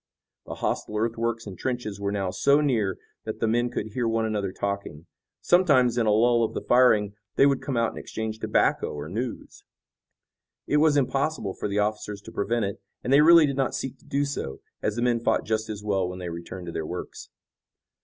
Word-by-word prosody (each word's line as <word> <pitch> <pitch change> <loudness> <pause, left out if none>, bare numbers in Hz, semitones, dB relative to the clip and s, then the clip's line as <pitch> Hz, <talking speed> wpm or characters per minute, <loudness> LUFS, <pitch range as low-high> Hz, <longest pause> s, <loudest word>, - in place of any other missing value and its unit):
The - - -5
hostile 105 - -2
earthworks 115 +1 -1
and 100 -3 -7
trenches 120 -6 -3
were 100 0 -1
now 100 -2 -1
so 140 +10 +3
near 115 -10 +1 0.3
that - - -5
the 115 - +1
men 120 +2 +1
could 120 - -4
hear 120 -1 0
one 115 0 +1
another 105 -3 -1
talking. 100 -6 -4 0.4
Sometimes 145 -10 +4
in 120 -2 +1
a - - +4
lull 115 +2 +4
of 110 - -2
the - - -2
firing 110 -5 +4 0.2
they - - +6
would 140 -1 +2
come 135 -4 -3
out 115 -1 +2
and - - -8
exchange 110 0 -5
tobacco - - +1
or 75 0 -6
news. 115 +8 -5 1.0
It 150 - +1
was 150 -1 +4
impossible 135 -5 0
for - - -4
the 100 0 -2
officers 105 -1 -1
to - - -10
prevent 115 +1 0
it, 100 0 -5 0.2
and 130 - +1
they 140 - +7
really 165 0 +8
did 140 -2 -2
not 135 -2 0
seek 135 0 -5
to - - -24
do 140 +1 0
so, 140 - -4 0.2
as 105 - -1
the 120 - -1
men 120 -1 +2
fought 115 - +1
just 110 0 -1
as 105 -1 -5
well 95 -3 0
when 90 - -7
they 90 -1 -5
returned 85 +2 -7
to 85 - -5
their 80 - -3
works. 90 +3 -7
110 Hz, 215 wpm, -26 LUFS, 100-130 Hz, 1.0 s, really